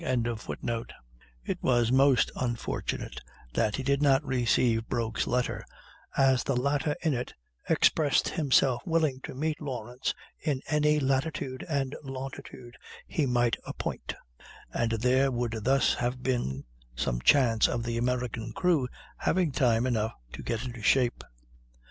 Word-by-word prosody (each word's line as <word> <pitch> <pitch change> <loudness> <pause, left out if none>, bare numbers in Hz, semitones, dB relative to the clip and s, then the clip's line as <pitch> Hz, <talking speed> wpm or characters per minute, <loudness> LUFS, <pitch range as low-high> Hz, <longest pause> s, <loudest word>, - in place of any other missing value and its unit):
] - - -10
It 110 - -4
was 120 -2 +2
most 135 -2 +4
unfortunate 115 - -3 0.3
that 110 -2 +1
he 135 - -3
did 140 +1 +1
not 140 0 +4
receive 120 -3 +2
Broke's 115 -3 -1
letter, 125 0 0 0.5
as 130 -2 +4
the 135 - 0
latter 140 +3 +1
in 160 -3 +2
it 125 0 -4 0.3
expressed 145 -4 +3
himself 135 -6 +2
willing 160 -5 +1
to - - -7
meet 155 +3 -2
Lawrence 125 -3 -3 0.2
in 145 -4 -1
any 150 0 +3
latitude 135 -1 -1
and 140 -2 -1
longitude 130 -2 -8 0.3
he 150 -4 0
might 120 -2 +2
appoint; - - -5 0.6
and 115 -1 0
there 125 +4 +3
would 120 -3 -2
thus 135 +1 +4
have 125 +1 -2
been 70 - -1 0.3
some - - -1
chance 120 - +5
of 115 - -2
the 115 0 -2
American 120 -2 -2
crew 165 -6 +2 0.3
having 180 -4 +1
time 120 -3 +2
enough 115 -3 0 0.2
to - - -7
get 115 +2 -3
into 120 -2 -7
shape. 125 +2 +2
125 Hz, 135 wpm, -29 LUFS, 115-135 Hz, 0.6 s, chance